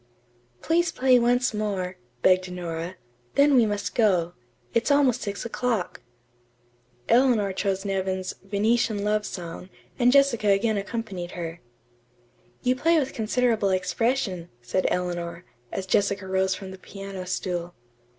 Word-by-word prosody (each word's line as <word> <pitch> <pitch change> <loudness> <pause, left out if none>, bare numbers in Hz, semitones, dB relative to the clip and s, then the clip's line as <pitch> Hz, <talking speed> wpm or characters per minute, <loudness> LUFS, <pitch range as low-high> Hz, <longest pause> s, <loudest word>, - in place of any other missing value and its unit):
"Please 335 +1 +2
play 255 -1 +4
once 245 +1 +2
more," 195 -4 -2 0.3
begged 185 0 +4
Nora. 170 0 -5 0.4
"Then 285 +1 +5
we 240 -4 +5
must 205 -1 -2
go. 180 -7 +2 0.4
It's 230 - +1
almost 275 -4 +3
six 200 +1 -4
o'clock." 235 -4 -2 1.1
Eleanor 230 -5 +3
chose 195 0 -1
Nevin's 190 -1 -2
"Venetian 215 +1 +1
Love 210 0 0
Song," 180 0 -7 0.3
and 245 0 +5
Jessica 275 -6 +4
again 205 +2 +3
accompanied 195 -4 -5
her. 170 -1 -6 1.0
"You 250 +1 +3
play 330 +6 +3
with 270 -3 0
considerable 225 -2 +1
expression," 185 -1 0
said 180 +10 0
Eleanor, 175 -1 -3 0.3
as 190 - -3
Jessica 200 0 +1
rose 190 0 +1
from 190 -2 -8
the 190 - -10
piano 195 -1 -8
stool. 175 -1 -3
200 Hz, 130 wpm, -25 LUFS, 185-235 Hz, 1.1 s, Then